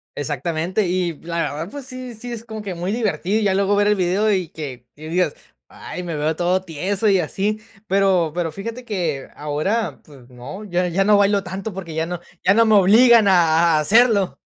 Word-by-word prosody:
Exactamente. 160 - -2
Y 180 -1 0
la 170 0 -5
verdad, 155 +3 -3
pues, 285 -2 -8
sí 255 -2 -8
sí 240 +3 -8
es 230 -1 -7
como 220 -2 -7
que 195 -3 -5
muy 175 +3 -3
divertido, 215 -2 -1
ya 200 -3 +2
luego 200 +1 +2
ver 205 0 +2
el 210 - +3
video, 195 +4 +1
y 185 -5 0
que 130 -6 -8
y 155 +2 -10
digas: 180 +2 0 0.4
"Ay, 180 - -8
me 170 -2 -4
veo 155 +2 0
todo 180 +2 +1
tieso 190 +5 -2
y 195 -2 +4
así". 205 +6 -2 0.3
Pero 190 -4 +2
pero 170 -2 -1
fíjate 230 +8 -7
que 170 - -3
ahora, 155 +10 -2
pues 135 -4 -17
no, 125 +12 -9
ya 180 -2 0
ya 195 +3 +1
no 210 -1 +5
bailo 200 0 +2
tanto 190 +3 -6
porque 175 -4 -7
ya 160 0 0
no 175 0 -5 0.2
ya 195 - +5
no 230 +2 +4
me 220 -1 +4
obligan 220 +3 +6
a 170 -2 +4
a - - +2
hacerlo. 210 +3 +3
185 Hz, 205 wpm, -21 LUFS, 165-210 Hz, 0.4 s, obligan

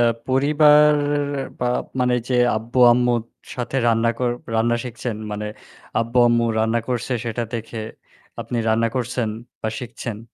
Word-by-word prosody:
আ - - +5 0.2
পরিবার 150 +3 +5 0.6
বা 125 - -2 0.4
মানে 125 0 +2
যে 130 - 0 0.2
আব্বু-আম্মুর 120 +1 +3 0.3
সাথে 125 +2 -3
রান্না 115 0 +3
কর 125 -1 +1 0.2
রান্না 115 +1 +2
শিখছেন 120 -2 -5 0.2
মানে 105 +1 -4 0.5
আব্বু-আম্মু 120 0 +3
রান্না 110 +1 +2
করছে 125 +1 -2
সেটা 120 0 -2
দেখে 115 0 -5 0.6
আপনি 120 - -4
রান্না 115 +1 +2
করছেন 125 -2 -1 0.3
বা 110 - 0
শিখছেন? 115 -3 -6
120 Hz, 130 wpm, -21 LUFS, 115-125 Hz, 0.6 s, আ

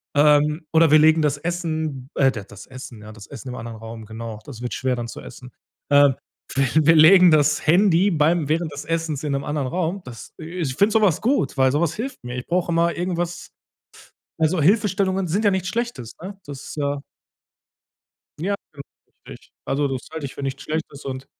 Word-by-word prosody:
ähm, 150 +2 +3
oder 160 0 +5
wir 155 - +7
legen 160 +1 +5
das 145 -1 +1
Essen, 160 -5 -3
äh, 135 -1 +4
d 110 -5 -7
das 100 - -12
Essen 130 -4 -10
ja, 105 +1 -10
das 105 -2 -12
Essen 130 -2 -9
im 125 - -6
anderen 115 -1 -7
Raum. 115 0 -9
Genau, 110 0 -7
das 120 -4 -10
wird 125 - -4
schwer 130 -1 -1
dann 120 -1 -5
zu - - -9
essen. 125 -1 -12 0.4
Ähm. 145 -1 +6 0.4
Wi 135 0 +3 0.2
wir 165 +1 +6
legen 180 +4 +8
das 150 -1 +2
Handy, 185 +3 +4
beim 160 -1 +2
während 160 0 0
des 145 - -6
Essens 165 -3 -2
in 150 - -2
'nem 140 - -2
anderen 145 -2 -2
Raum. 180 +6 -2
Das, 120 -2 -10
äh 155 - -8 0.2
ich 130 -5 -2
finde 200 +9 +3
so 220 - +4
was 190 -7 +2
gut, 255 - 0
weil 130 -1 +4
so 145 - +2
was 170 -3 +1
hilft 250 - -6
mir. 120 0 -6
Ich 125 - -6
brauche 175 0 0
immer 170 +1 +2
irgendwas 175 -1 -3 0.9
also, 160 +2 +2
Hilfestellungen 195 0 +2
sind 200 +7 0
ja 205 - +5
nichts 190 -1 -1
Schlechtes, 230 - -4
ne? 195 +2 -8
Das, 140 -2 -8
äh 145 -1 -1 1.4
Ja, 190 +6 -1 0.2
genau, 140 - -9 0.5
richtig. - - -13
Also, 140 +1 0
das 130 -2 -5
halte 160 -3 -5
ich 135 - -10
für - - -8
nichts 135 +1 -4
Schlechtes 155 -2 -5
und 130 0 -6
150 Hz, 205 wpm, -22 LUFS, 135-175 Hz, 1.4 s, legen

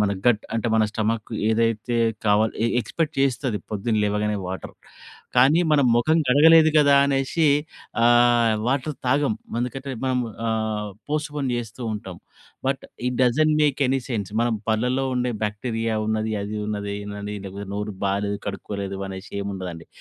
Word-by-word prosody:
మన 105 -1 +2 0.2
గట్ 115 -3 +4
అంటే 115 +1 -1
మన 110 - +4
స్టొమక్ 110 +1 -2 0.2
ఏదైతే 115 +1 +1 0.3
కావాలో 105 +2 +3
ఎ - - +3
ఎక్స్‌పెక్ట్ 155 +7 -2
చేస్తది 130 -4 0
పొద్దున 110 +2 -1
లేవగానే 105 0 0
వాటర్. 95 - -6 0.6
కానీ 140 +7 +6
మనం 140 -3 +4
మొఖం 155 +7 +3
కడగలేదు 160 +4 +7
కదా 145 -1 +5
అనేసి 140 +3 +1 0.6
ఆహ్, 120 -1 +5
వాటర్ 140 +3 -1
తాగం. 135 -1 +2 0.3
అందుకంటే 135 +2 -4
మనం 130 -1 +1 0.3
ఆహ్, 110 -2 -2 0.2
పోస్ట్‌పోన్ 150 -3 -2
జేస్తూ 120 +1 -5
ఉంటాం. 95 -4 -7 0.5
But, 135 0 -1 0.2
it 125 - -3
doesn't 155 +5 +3
make 145 -1 +1
any 135 0 +1
sense 105 -6 -3
మనం 120 -1 +1 0.2
పల్లలో 125 +4 +1
ఉండే 125 -1 0
బాక్టీరియా 110 +1 -2
ఉన్నది, 110 0 -1
అది 105 +1 -4
ఉన్నది, 100 -1 -3
ఇదున్నది 105 0 -7
అని 105 +1 -5
లేకపోతే 100 +1 -7
నోరు 105 0 -4
బాలేదు, 100 +1 -1
కడుక్కోలేదు 100 -1 -4
అనేసి 95 0 -8
ఏం 100 - -4
ఉండదండి. 90 -3 -7
115 Hz, 150 wpm, -23 LUFS, 105-135 Hz, 0.6 s, కడగలేదు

